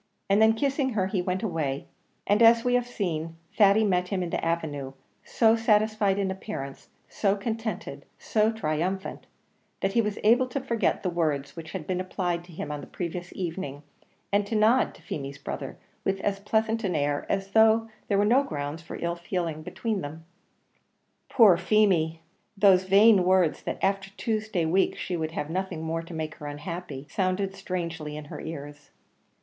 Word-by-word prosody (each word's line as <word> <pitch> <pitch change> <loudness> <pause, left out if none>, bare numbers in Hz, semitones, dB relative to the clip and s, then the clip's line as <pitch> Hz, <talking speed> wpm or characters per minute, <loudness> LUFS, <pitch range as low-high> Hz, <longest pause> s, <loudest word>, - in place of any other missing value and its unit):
And 200 +2 +5
then, 220 0 +6
kissing 275 +1 0
her, 195 -3 +1
he 190 -1 -1
went 185 +2 -2
away, 155 -8 -2 0.4
and 205 +2 +3
as 230 0 +7
we 245 - +2
have 245 -1 +2
seen, 165 -8 -3 0.2
Thady 205 +1 +5
met 180 -3 +1
him 185 -1 -1
in 170 - -4
the - - -2
avenue, 150 -5 -2 0.3
so 225 -1 +3
satisfied 215 -3 +2
in 195 -1 0
appearance, 190 -8 -7 0.2
so 200 -1 +1
contented, 220 -1 -4
so 215 0 +1
triumphant, 185 -1 -3 0.5
that 195 0 -1
he 230 - +4
was 210 -2 -2
able 240 +4 +5
to 255 +3 -3
forget 235 -4 0
the 180 - 0
words 150 -5 -1
which 165 -1 -8
had 185 -5 -5
been 185 +1 -1
applied 180 -2 -2
to 175 - -15
him 155 -2 -5
on 145 -1 -4
the - - -10
previous 175 0 -5
evening, 165 -5 -4 0.5
and 205 0 +2
to 225 - -2
nod 220 +4 +3
to - - -18
Feemy's 140 -1 -5
brother 140 - -6 0.3
with 195 0 0
as 195 -1 -1
pleasant 220 +2 0
an 185 -4 0
air 145 -1 0
as 195 0 -1
though 220 +1 +5 0.2
there 200 - +2
were 205 - +3
no 245 +6 +5
grounds 150 - -4
for 165 - -8
ill 170 0 -1
feeling 170 -3 -3
between 215 +5 -3
them. 160 +2 -8 1.0
Poor 210 -8 +6
Feemy! 170 -7 +2 0.4
those 190 -2 +5
vain 200 +1 +6
words 185 -3 +3
that - - -4
"after 195 0 +1
Tuesday 215 -6 -1
week 185 +4 +2
she 180 - -3
would 160 -1 -3
have 150 -1 -3
nothing 185 -2 -3
more 165 +1 -2
to 165 0 -9
make 155 -1 -3
her 150 - -7
unhappy," 150 -1 -6
sounded 190 +1 -1
strangely 170 -5 -4
in 150 - -7
her - - -6
ears. 145 -2 -8
185 Hz, 180 wpm, -27 LUFS, 160-215 Hz, 1.0 s, as